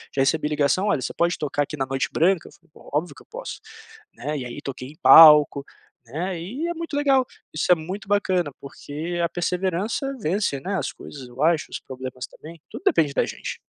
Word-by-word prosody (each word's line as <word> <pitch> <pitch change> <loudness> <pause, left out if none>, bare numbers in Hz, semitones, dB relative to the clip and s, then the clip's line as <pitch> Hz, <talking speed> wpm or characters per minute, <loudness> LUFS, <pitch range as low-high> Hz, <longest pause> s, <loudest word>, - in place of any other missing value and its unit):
já 135 - +2
recebi 150 +2 +1
ligação: 150 +7 +1
"Olha, 150 -10 +1
você - - -4
pode 170 +1 +1
tocar 145 -1 -1
aqui 150 - -7
na 135 - -1
Noite 135 0 -2
Branca?", 175 +1 +2
eu - - -14
falei: 170 -2 -26 0.2
"Óbvio 155 +5 -1
que - - -16
eu - - -21
posso", - - -7 0.6
né. 150 +1 -4
E 125 - -5
aí 120 - -7
toquei 130 -2 -6
em 150 - -14
palco, 150 -3 +8 0.4
né, 170 +9 -4
e 255 - -4
é 345 - -2
muito 330 -3 -6
legal, 275 -3 +3 0.3
isso 155 - 0
é - - +8
muito 185 +6 -7
bacana. 185 -5 +1
Porque 155 +5 -6
a 170 - +1
perseverança 185 - -2
vence, 185 -6 -1
né, 195 +7 -3
as - - -2
coisas, 135 -3 -10
eu 125 +2 -9
acho, 165 -1 +2
os - - -4
problemas 130 0 -7
também, 165 +1 -13
tudo - - -8
depende 150 -4 +3
da - - +2
gente. - - -6
165 Hz, 210 wpm, -23 LUFS, 145-190 Hz, 0.6 s, palco